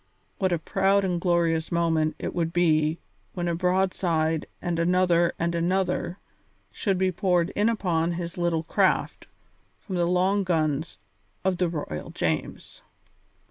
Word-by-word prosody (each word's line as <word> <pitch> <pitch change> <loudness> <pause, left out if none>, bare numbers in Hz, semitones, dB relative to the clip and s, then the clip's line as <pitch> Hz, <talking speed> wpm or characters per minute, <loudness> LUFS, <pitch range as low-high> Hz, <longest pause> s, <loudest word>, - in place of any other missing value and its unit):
What 190 -2 +1
a 175 - +2
proud 195 +4 +1
and 175 -2 -1
glorious 170 -2 +1
moment 160 -2 +1
it - - -4
would 165 -2 -1
be 160 -2 +2 0.4
when 175 -1 -2
a 170 - 0
broadside 175 -3 0
and 175 -2 -2
another 175 0 +3
and 170 +1 -1
another 180 +1 0 0.5
should 195 -3 -1
be 190 0 +1
poured 180 -1 +1
in 210 +2 +2
upon 175 -6 0
his 170 0 -5
little 170 -2 0
craft - - 0 0.5
from 190 -3 -5
the 170 -1 +2
long 185 +3 +2
guns 160 -3 -1 0.5
of 190 -1 +1
the 180 -1 +1
Royal 145 - -5
James. - - -3
175 Hz, 140 wpm, -26 LUFS, 165-185 Hz, 0.5 s, another